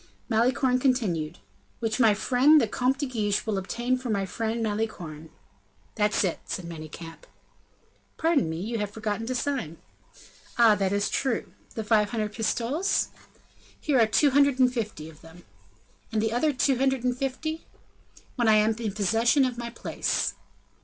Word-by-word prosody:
Malicorne 250 +3 +2
continued: 185 - 0 0.4
"Which 225 +1 -2
my 220 -4 +5
friend 265 +8 +5
the 235 - +1
Comte 255 +5 0
de 285 - -2
Guiche 215 -6 -1
will 210 -3 -1
obtain 240 +6 -1
for 250 -1 -6
my 200 -3 0
friend 225 +4 -2
Malicorne." 180 -8 -4 0.6
"That's 210 -1 +1
it," 180 -4 -1
said 185 - -5
Manicamp. 165 0 -9 0.9
"Pardon 320 - +2
me, 160 +1 -4
you 225 +5 -3
have 210 -1 -2
forgotten 220 +1 -4
to 255 - -2
sign." 245 - -2 0.8
"Ah! 230 -2 +7
that 195 -2 0
is 205 0 +1
true. 260 -5 -1 0.2
The 220 - -3
five 210 -1 +3
hundred 215 -2 -2
pistoles?" 245 - 0 0.7
"Here 285 -5 +1
are 225 - +5
two 270 +7 +3
hundred 280 -1 +4
and 255 -1 +4
fifty 210 -10 -4
of 160 -1 -14
them." 165 +2 -15 0.7
"And 220 - 0
the 220 +1 0
other 300 +6 +2
two 270 -1 +1
hundred 265 -2 +1
and 250 -1 +1
fifty?" 295 +5 -4 0.7
"When 240 -2 +2
I 220 - +6
am 215 +1 +3
in 220 -4 -3
possession 225 +7 +3
of 245 -2 -3
my 235 0 -4
place." 235 - -2
225 Hz, 165 wpm, -26 LUFS, 205-255 Hz, 0.9 s, Ah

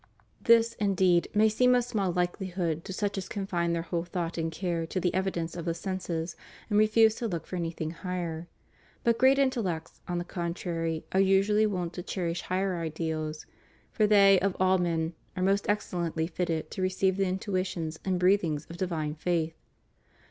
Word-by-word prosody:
This, 230 0 +5
indeed, 190 -4 +3
may 215 +1 +6
seem 250 +4 +4
of 245 - +3
small 210 -6 -1
hkehhood 175 -2 -1
to - - -6
such 200 +1 -1
as 190 - -7
confine 180 -5 -1
their 165 -1 -1
whole 170 0 -2
thought 175 -1 -3
and 165 -1 -2
care 170 -1 -2
to 185 - -2
the 180 -1 0
evidence 185 -3 -1
of 170 -2 -5
the 165 -1 -1
senses, 175 -3 -3 0.4
and 205 - +4
refuse 220 +1 +5
to 235 - -2
look 170 -6 -4
for - - -6
anything 165 -2 -3
higher. 175 -2 -4 0.6
But 235 -1 +2
great 265 +2 +6
intellects, 220 -12 -1
on 175 - -2
the 175 - -1
contrary, 170 -2 -3
are 190 - +2
usually 195 +3 +4
wont 180 -4 -3
to 180 - -5
cherish 175 -2 -3
higher 185 0 -1
ideals; 155 -1 -3 0.5
for 215 -2 +2
they, 200 -2 +6
of 195 0 -1
all 185 0 +4
men, 165 -1 0 0.2
are 185 - 0
most 200 +2 +1
ex 210 0 0
cellently 165 -2 -1
fitted 165 -2 -2
to - - -4
receive 185 0 +1
the 195 -1 +2
intuitions 185 -4 -2
and 185 -2 0
breathings 180 -5 +2
of 170 - -8
divine 165 -5 -2
faith. 165 0 -1
180 Hz, 180 wpm, -29 LUFS, 165-195 Hz, 0.6 s, may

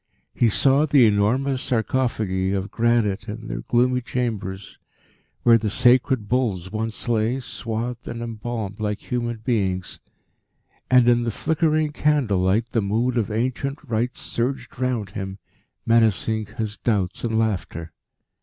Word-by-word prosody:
He 120 - +3
saw 140 +7 +3
the 140 -4 +6
enormous 125 +6 +2
sarcophagi 110 -6 0
of 100 +1 -3
granite 115 -3 +1
in 115 +2 -6
their - - -4
gloomy 125 +1 +2
chambers 105 -6 -4 0.6
where 115 -1 +6
the 110 - -1
sacred 125 0 +3
bulls 100 -7 -1
once 110 +2 -3
lay, 115 +2 +1
swathed 120 -1 -5
and 115 - -5
embalmed 115 -2 -5
like 105 -1 -1
human 120 -2 -2
beings, 95 -7 -1 0.9
and, 125 -2 +5
in 120 0 +5
the 120 - -1
flickering 155 +4 +1
candle 145 -10 +1
light, 100 +6 +1
the 115 - +1
mood 115 +5 0
of 115 -2 0
ancient 130 +5 -2
rites 120 -1 -2
surged 125 +1 -3
round 120 -7 -1
him, 95 -1 -5 0.5
menacing 110 -1 +2
his 110 -1 -5
doubts 100 -5 -1
and 110 -2 0
laughter. 85 -7 -2
115 Hz, 135 wpm, -23 LUFS, 105-125 Hz, 0.9 s, the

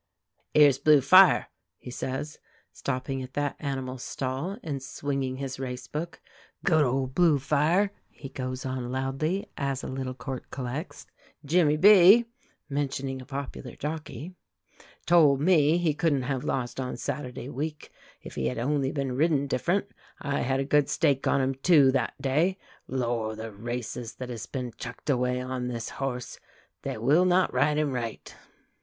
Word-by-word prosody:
"'Ere's 145 -3 +6
Blue 150 0 +6
Fire," 185 +8 +6 0.3
he 125 - -10
says, 135 +4 -4 0.3
stopping 135 0 -3
at 130 0 -8
that 145 -1 -1
animal's 130 -3 -4
stall, 135 +12 -3
and 140 -4 -4
swinging 135 -1 -3
his 135 0 -5
race 125 -1 -5
book. 165 +3 -5 0.5
"Good 160 -5 +4
old 130 0 -1
Blue 165 -2 +4
Fire!" 155 +8 +2 0.2
he 140 - -10
goes 130 0 -5
on 130 -2 -3
loudly, 135 +8 -1
as 140 -2 -2
a - - -4
little 130 -1 -4
court 130 0 -6
collects. 135 +6 -5 0.4
"Jimmy 155 -1 +3
B 205 +5 +8 0.2
" - - -40
(mentioning 135 -2 -3
a 130 - -13
popular 140 -2 -6
jockey) 155 +3 -6 0.7
"told 155 -6 +5
me 160 -1 +4
he 170 -3 +1
couldn't 145 -4 +1
have 130 -1 -2
lost 125 0 -2
on 130 -1 -3
Saturday 125 -3 -5
week 150 +3 -5 0.3
if - - -9
he 65 - -1
had 65 - -3
only 135 +2 0
been 135 -3 -2
ridden 145 -1 +2
different. 175 +9 0 0.3
I 140 -1 -2
had 135 +1 0
a 135 - 0
good 145 0 +3
stake 135 -2 +1
on 140 - +3
him, 130 +1 0
too, 135 0 +5
that 135 - -1
day. 160 +8 +1 0.3
Lor', 120 -4 -2
the 110 +1 -7
races 120 +2 -5
that 125 -1 -7
has 115 -4 -6
been 125 -3 -5
chucked 125 +4 -4
away 125 -1 0
on 125 -1 -3
this 120 -2 -4
horse. 125 -3 -5 0.4
They - - -4
will 145 +11 +3
not 185 0 +3
ride 150 0 +2
him 150 -2 +1
right." 120 -3 -5
135 Hz, 160 wpm, -27 LUFS, 130-150 Hz, 0.7 s, B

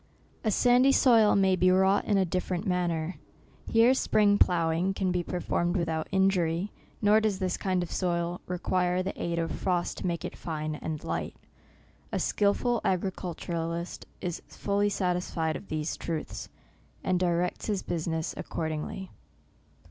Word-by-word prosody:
A 220 - +2
sandy 245 +5 +5
soil 230 -6 +5
may 190 -1 +4
be 185 0 +3
wrought 190 +2 +3
in 205 - +2
a 190 - +3
different 180 +2 -2
manner. 175 -2 -1 0.5
Here 230 +3 +5
spring 205 -5 +3
ploughing 170 +2 +2
can 190 -2 0
be 180 0 +1
per 180 +1 -4
formed 175 +1 0
without 160 -2 -1
injury, 190 -1 +1 0.3
nor 210 +1 +6
does 215 -3 +1
this 185 -2 -1
kind 185 -2 0
of 175 - -7
soil 175 -1 -1
require 180 0 0
the 195 - -3
aid 170 0 -1
of 165 -1 -1
frost 180 -2 -1
to - - -2
make 170 -1 -2
it 180 - -5
fine 155 -2 -4
and 155 0 -5
light. - - -3 0.8
A - - -1
skilful 220 +4 +1
agriculturist 175 -2 -3
is 175 -2 -3
fully 205 +1 0
sat 180 -3 0
isfied 165 -3 -2
of - - -8
these 155 0 -2
truths, 165 -2 -5 0.5
and 185 -1 +1
directs 175 0 0
his 205 -3 -1
business 160 -1 -2
accordingly. 160 +4 -4
180 Hz, 155 wpm, -28 LUFS, 170-195 Hz, 0.8 s, nor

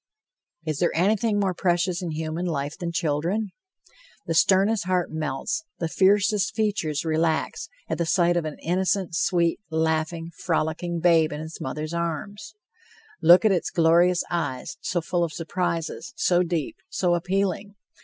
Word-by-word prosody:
Is 155 -3 -2
there 175 - +3
anything 205 +4 +2
more 195 -2 +1
precious 175 0 0
in 175 - -3
human 160 +3 -3
life 145 -3 -2
than 170 -1 -4
children? 170 +6 -1 0.7
The 165 - -1
sternest 195 +5 +3
heart 180 -1 0
melts, 155 - -2
the 165 - -2
fiercest 200 +3 +2
features 200 -9 -1
relax, 160 0 0 0.2
at - - -3
the 170 - 0
sight 175 0 +3
of 175 - +1
an 155 -1 -5
innocent, 185 +1 0
sweet, 170 0 +1
laughing, 160 +1 -1
frolicking 165 0 -1
babe 165 -2 +4
in 150 - -5
its 160 +1 -8
mother's 150 +4 -4
arms. 170 +6 -4 0.7
Look 175 +5 +7
at 215 - +5
its 180 -3 0
glorious 170 +2 +3
eyes, 150 - -3
so 175 -1 -1
full 175 +2 -1
of 165 -2 -2
surprises, 165 -5 -3
so 175 0 +2
deep, 170 -5 -2
so 180 -2 +1
appealing! 195 +3 -1
170 Hz, 150 wpm, -25 LUFS, 160-185 Hz, 0.7 s, Look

